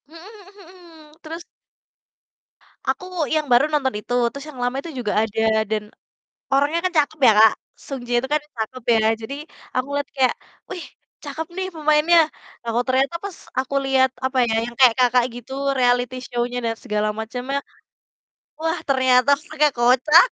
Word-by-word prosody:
Mhm 325 +3 -14
mhm 400 0 -15
mhm, 330 -4 -17
terus 330 +2 -8 1.5
Aku, 365 - -1 0.2
yang 310 -1 +1
baru 245 +4 +6
nonton 270 -3 +1
itu, 245 - -5 0.2
terus 280 +1 -8
yang 290 - -11
lama 245 +1 -1
itu 335 - -8
juga 210 -4 -2
ada 225 0 -1 0.3
dan 215 -1 -1 0.7
orangnya 285 +4 +2
kan 370 - 0
cakep 300 +2 -3
ya, 225 - +8
Kak, 220 0 +8 0.3
Sung 275 -2 -5
J - - -16
itu 265 - -6
kan 305 - +2 0.2
cakep 230 +3 -5
ya, 225 - +3 0.2
jadi 225 +5 -6 0.4
aku 255 +1 0
liat 285 0 -2
kayak, 260 -2 +3 0.3
"Wih 355 - -6 0.4
cakep 300 +3 -5
nih 380 0 -2
pemainnya," 310 +2 +4 0.4
lah 235 - -5
kok 245 - +2
ternyata 265 +5 +2
pas 395 -4 -6 0.2
aku 265 +1 -2
liat 265 -1 +3 0.2
apa 260 0 -2
ya, 220 - 0
yang 240 - -8
kayak, 250 -3 +7
Kakak, 250 -1 +4
gitu 245 +2 -10 0.3
reality 245 0 +2
show-nya 245 +1 -2
dan 230 0 0
segala 210 -3 0
macamnya, 250 +5 -3 1.0
wah, 325 +1 -1
ternyata 260 -1 +3 0.2
pakek 300 -1 +2
kocak. 260 - +6
265 Hz, 165 wpm, -22 LUFS, 245-310 Hz, 1.5 s, ya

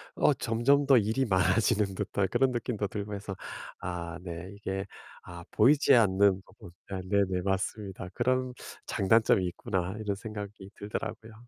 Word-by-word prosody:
어 150 - +4
점점 130 +5 +2
더 135 -2 +7
일이 115 +4 +1
많아지는 100 +1 +2
듯한 100 0 -1
그런 135 -1 +2
느낌도 120 -4 -2
들고 105 +1 -5
해서 100 -1 -6 0.5
아 90 -1 -4
네 85 0 -7
이게 95 -1 -4 0.4
아 85 -1 -10
보이지 140 +7 +5
않는 100 -3 +4
부분 90 - -15 0.2
아 95 -1 -3
네네. 95 -2 +1
맞습니다. 95 -1 -3
'그런 130 +1 0 0.3
장단점이 100 -1 +3
있구나.' 90 +1 -3
이런 105 -2 -2
생각이 105 -2 -8
들더라고요. 110 +2 -6
100 Hz, 310 characters per minute, -29 LUFS, 95-115 Hz, 0.5 s, 더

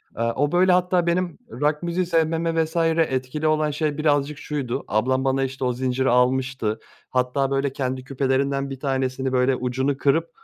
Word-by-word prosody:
Aaa, 115 +1 0
o, 145 +1 +1
böyle, 180 +1 +4
hatta, 180 -1 +2
benim 175 -1 0
rock 150 +6 -1
müziği 175 +1 0
sevmeme 165 -1 +1
vs. 160 - -12 0.4
etkili 130 +4 -2
olan 155 -1 +2
şey 150 -1 -1
birazcık 145 -1 +1
şuydu: 140 -6 -3
Ablam, 130 +6 +1
bana, 135 0 +1
işte, 130 0 -3
o 125 - +1
zinciri 130 +1 0
almıştı, 125 -3 +1 0.3
hatta 130 +2 0
böyle, 135 0 0
kendi 130 -2 -3
küpelerinden 135 +1 0
bir 135 -1 -7
tanesini, 130 -1 -1
böyle, 130 +1 +3
ucunu 130 +2 -1
kırıp, 160 +4 +1
135 Hz, 165 wpm, -23 LUFS, 130-155 Hz, 0.4 s, böyle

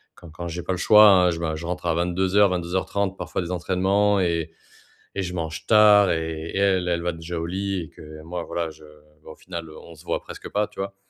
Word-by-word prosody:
quand 85 - -14
quand 85 +2 -7
j'ai 85 +1 -5
pas 90 - -3
le - - -3
choix, 105 0 +7
hein, 90 -2 +5
je 80 - -4
me 80 -2 -2
je 80 - -7
rentre 90 0 -4
à 85 - +2
22:00-22:30, 95 +2 0
parfois - - -4
des 85 - -6
entraînements 95 +3 +1
et 85 -3 -1 0.6
et 100 - -2
je 90 -1 -5
mange 80 -2 -5
tard 105 -3 +6
et 80 +1 -3
elle, 95 -2 +2
elle 85 -1 0
va 85 0 -1
déjà 80 +1 -6
au - - -3
lit 95 +1 -2
et 80 - -9
que 75 0 -12
moi, 85 +1 -5
voilà, 85 -2 -3
je 80 0 -16 0.4
bah, - - -12
au - - -16
final 85 -3 -8
on 80 +2 -12
se 75 - -17
voit - - -2
presque - - -10
pas, 105 +1 0
tu - - -11
vois? 100 0 -4
90 Hz, 235 wpm, -23 LUFS, 85-95 Hz, 0.6 s, choix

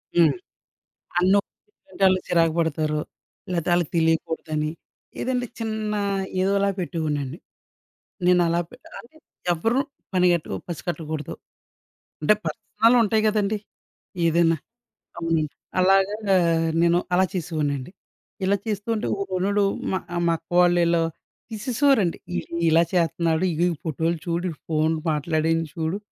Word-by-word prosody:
హ్మ్. 170 -2 +5 0.9
అన్నోఇట్టాంటోళ్ళే 195 - +1
చిరాకు 165 -2 +3
పడతారు, 155 -1 0 0.5
లేతే 170 -1 -1
ఆళ్ళకి 175 -3 +1
తెలియకూడదని. 160 -1 0 0.5
ఏదంటే 250 -1 0
చిన్నా 215 -2 -2 0.4
ఏదోలా 200 +1 +2
పెట్టేవోడినండి. 155 -5 -2 0.9
నేనలా 175 -1 +4
పెట్టెగాలనే, 250 +3 -13 0.3
ఎవ్వరు 225 +10 +1 0.3
పనిగట్టుకు 175 -3 +2
పసికట్టకూడదు. 160 -3 -4 0.9
అంటే, 150 - +5
పర్సనలుంటయి 225 0 +2
గదండి 210 0 +1 0.7
ఏదైనా 165 0 +3 0.6
గమ్ముని. 165 -2 0 0.4
అలాగా 195 +2 +4 0.7
నేను 170 0 +4 0.2
అలా 185 +1 +4
చేసేవోడినండి. 155 -5 -2 0.5
ఇలా 200 +2 +3
చేస్తూ 210 0 -3
ఉంటే 215 - -2 0.2
ఒకొనుడు 200 +2 0 0.3
మా 190 - +1 0.2
ఆహ్, 175 - 0
మా 165 - +3
అక్క 165 - -40
వాళ్ళీళ్ళు 170 -1 +4 0.5
తీసేసేవారండి. 225 - +1 0.2
"ఈడు 85 - -5
ఇలా 165 +1 +5
చేత్తన్నాడు, 170 -1 +1
ఇగో 165 +2 +1
ఈ - - -3
ఫోటోలు 165 +3 0
చూడు, 170 +1 -1
ఈ - - -24
ఫోన్లు 155 0 +1
మాట్లాడింది 160 +2 0
చూడు," 165 +4 -1
175 Hz, 105 wpm, -24 LUFS, 160-200 Hz, 0.9 s, హ్మ్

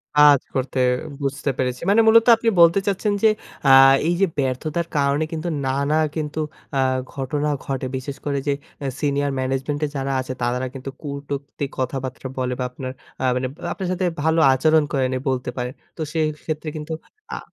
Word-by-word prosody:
কাজ 150 -2 +7 0.2
করতে 130 0 -1 0.4
বুঝতে 140 +1 -1
পেরেছি। 125 -1 -1
মানে 215 +3 +6
মূলত 230 0 +7
আপনি 225 0 +1
বলতে 170 +3 +7
চাচ্ছেন 205 +1 +1
যে 220 - +7 0.4
আ - - +7 0.4
এই 175 - +3
যে - - +7
ব্যর্থতার 145 +5 -1
কারণে 140 +2 +2
কিন্তু 160 +1 -3 0.2
নানা 140 +3 +1 0.2
কিন্তু 155 -1 -3 0.4
আ - - +2 0.3
ঘটনা 145 +2 -1 0.2
ঘটে। 135 -1 -2
বিশেষ 135 +2 -6
করে 140 -1 0
যে 140 - +3 0.3
অ্যা 140 - -1
সিনিয়র 145 -1 0
ম্যানেজমেন্টে 135 +3 -1
যারা 135 0 -2
আছে 130 0 -5
তারা 125 +1 0
কিন্তু 135 0 -6
কুটুক্তি 140 -1 -5
কথাবার্তা 130 0 -3
বলে 125 -1 -1
বা - - 0
আপনার 130 0 -6 0.3
আ - - -1
মানে 130 0 -1 0.3
আপনার 190 -2 -4
সাথে 185 0 0 0.2
ভালো 160 +1 +3
আচরণ 155 +3 +4
করে 135 -2 +2
নাই 130 - -1
বলতে 125 -1 -1
পারেন। 125 +1 -3 0.2
তো 160 - -5
সেক্ষেত্রে 155 0 -2
কিন্তু 155 +1 -5 0.4
আ - - -5
140 Hz, 170 wpm, -22 LUFS, 130-155 Hz, 0.4 s, কাজ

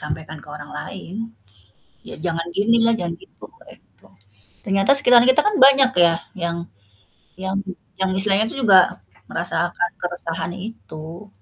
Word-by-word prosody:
sampaikan 155 +1 -6
ke - - -16
orang 150 0 -10
lain, 190 -2 -9 1.0
"Ya - - -8
jangan 165 -1 -2
ginilah, 230 +3 +3
jangan 170 -1 -3
gitu," 385 - -15 0.3
gitu. - - -23 0.6
Ternyata 195 +4 +2
sekitar 245 -4 +6
kita 260 - +5
kan 420 -1 +1
banyak 270 -1 +5
ya, 165 - +3 0.2
yang 170 -3 -3 0.8
yang 190 +1 -4 0.4
yang 190 0 +1
istilahnya 200 +2 +4
tuh - - -6
juga 195 -3 +7 0.5
merasakan 175 +1 -2
keresahan 175 -1 -5
itu. 180 -3 -10
190 Hz, 130 wpm, -20 LUFS, 170-225 Hz, 1.0 s, juga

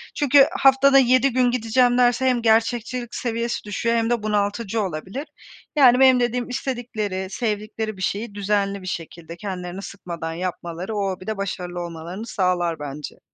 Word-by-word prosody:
Çünkü 285 -1 +5
haftada 270 +1 +5
7 255 +1 +4
gün 250 -1 +3
gideceğim 245 +1 +2
derse, 245 +1 +3
hem 250 -2 +2
gerçekçilik 235 +2 +1
seviyesi 235 -1 -2
düşüyor 230 +3 -1
hem 230 0 +1
de 235 -3 0
bunaltıcı 210 +1 -1
olabilir. 190 - -5 0.5
Yani, 255 -3 +6
benim 260 -1 +6
dediğim 245 +1 -1
istedikleri, 225 -7 -3
sevdikleri 215 -1 -3
bir - - -9
şeyi 205 +2 -3
düzenli 200 -1 0
bir 185 - -9
şekilde 170 -1 -6
kendilerini 185 -2 -6
sıkmadan 170 -5 -6
yapmaları 175 +3 -5
o 200 -2 0
hobide 190 +3 -5
başarılı 180 -3 -4
olmalarını 170 +5 -7
sağlar 175 -5 0
bence. 145 0 -7
215 Hz, 150 wpm, -22 LUFS, 185-245 Hz, 0.5 s, Yani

